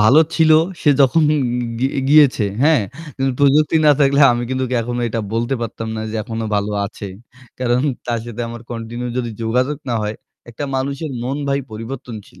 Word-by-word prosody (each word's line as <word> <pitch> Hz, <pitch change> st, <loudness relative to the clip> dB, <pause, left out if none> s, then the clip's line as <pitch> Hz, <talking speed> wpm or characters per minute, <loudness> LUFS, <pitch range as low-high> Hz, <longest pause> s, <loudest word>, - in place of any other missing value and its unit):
ভালো 125 Hz, +9 st, +6 dB
ছিল 160 Hz, -1 st, +4 dB, 0.3 s
সে 150 Hz, -, +5 dB
যখন 140 Hz, +4 st, +4 dB
গি 155 Hz, -, +2 dB, 0.4 s
গি 130 Hz, -, +2 dB, 0.2 s
গিয়েছে। 145 Hz, -6 st, +5 dB, 0.2 s
হ্যাঁ? 150 Hz, -5 st, +4 dB, 0.3 s
কিন্তু 135 Hz, 0 st, 0 dB
প্রযুক্তি 145 Hz, +2 st, +4 dB
না 150 Hz, -, +8 dB
থাকলে 140 Hz, 0 st, +4 dB
আমি 120 Hz, 0 st, -2 dB
কিন্তু 130 Hz, 0 st, -1 dB
ওকে 125 Hz, 0 st, -1 dB
এখনো 120 Hz, +1 st, -3 dB
এটা 115 Hz, +1 st, -2 dB
বলতে 120 Hz, +3 st, 0 dB
পারতাম 115 Hz, -1 st, -5 dB
না -, -, -3 dB
যে 110 Hz, -, -4 dB
এখনো 115 Hz, -1 st, -4 dB
ভালো 100 Hz, +1 st, -1 dB
আছে। 100 Hz, 0 st, -8 dB, 0.5 s
কারণ 125 Hz, -1 st, +1 dB, 0.3 s
তার 120 Hz, -1 st, 0 dB
সাথে 120 Hz, 0 st, -7 dB
আমার 120 Hz, 0 st, -8 dB
কন্টিনিউ 120 Hz, +1 st, -5 dB
যদি 120 Hz, -2 st, -2 dB
যোগাযোগ 125 Hz, +6 st, 0 dB
না -, -, 0 dB
হয়, 105 Hz, +1 st, -3 dB, 0.3 s
একটা 120 Hz, +5 st, -5 dB
মানুষের 140 Hz, +3 st, -3 dB
মন 130 Hz, +3 st, -2 dB
ভাই 140 Hz, 0 st, +1 dB
পরিবর্তনশীল। 115 Hz, -1 st, -8 dB
125 Hz, 185 wpm, -19 LUFS, 115-140 Hz, 0.5 s, না